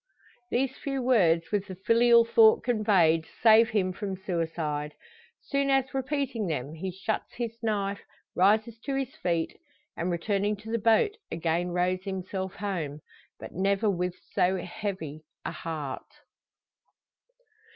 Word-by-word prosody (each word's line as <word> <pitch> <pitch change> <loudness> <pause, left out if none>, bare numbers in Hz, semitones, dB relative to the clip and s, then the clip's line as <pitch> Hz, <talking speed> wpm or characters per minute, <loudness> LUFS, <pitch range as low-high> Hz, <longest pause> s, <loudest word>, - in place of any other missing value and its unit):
These 265 +2 0
few 275 -1 -3
words, 175 -10 +3
with 205 -2 0
the 190 - -7
filial 230 +4 +5
thought 445 - +5
conveyed, 190 -9 +3 0.2
save 225 0 +7
him 190 -4 0
from 195 +1 -4
suicide. 160 -5 -3 0.5
Soon 275 0 0
as 270 -1 +2
repeating 265 -5 -1
them, 145 -2 -3
he 180 +4 -4
shuts 195 +4 -3
to - - -16
his 230 0 -6
knife, 200 -3 -1 0.3
rises 215 +4 +3
to 275 -1 -1
his 270 -1 -3
feet, 170 -2 -1 0.4
and 170 - -2
returning 200 +4 0
to 215 +2 -9
the 230 - 0
boat 230 - +3
again 170 +2 0
rows 180 +1 0
himself 190 -1 -4
home 165 -7 -4 0.4
but - - -8
never 200 +3 +1
with 180 -1 -2 0.2
so 185 +1 +2
heavy 180 -6 -5 0.2
a - - -2
heart. 150 -5 -6
195 Hz, 140 wpm, -28 LUFS, 175-230 Hz, 0.5 s, save